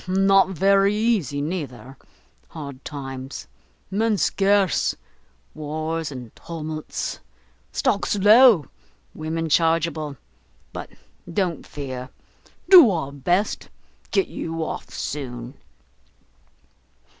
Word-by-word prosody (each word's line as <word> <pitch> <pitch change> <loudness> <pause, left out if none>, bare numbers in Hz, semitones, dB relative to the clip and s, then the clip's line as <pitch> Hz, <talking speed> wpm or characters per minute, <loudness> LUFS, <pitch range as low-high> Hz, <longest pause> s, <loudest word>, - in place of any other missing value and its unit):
Not 195 0 +4
very 195 +2 +3
easy, 210 - 0
neither! 135 -6 -5 0.5
hard 140 -3 -8
times! 135 -2 -7 0.4
men 215 +2 +1
scarce; 195 -2 +2 0.6
wars 155 +1 -3
and 125 -4 -9
tumults! 155 -2 -5 0.5
stocks 200 - 0
low! 210 - +7 0.5
women 160 +1 -3
chargeable! 160 -2 +1 0.6
but - - -6 0.4
don't 175 -4 -1
fear; 130 -3 -6 0.6
do 350 - +10
our 160 -7 -2
best; 175 +9 -1 0.4
get 390 - +1
you 165 0 -4
off - - -5
soon." 125 -3 -5
160 Hz, 85 wpm, -23 LUFS, 140-195 Hz, 0.6 s, do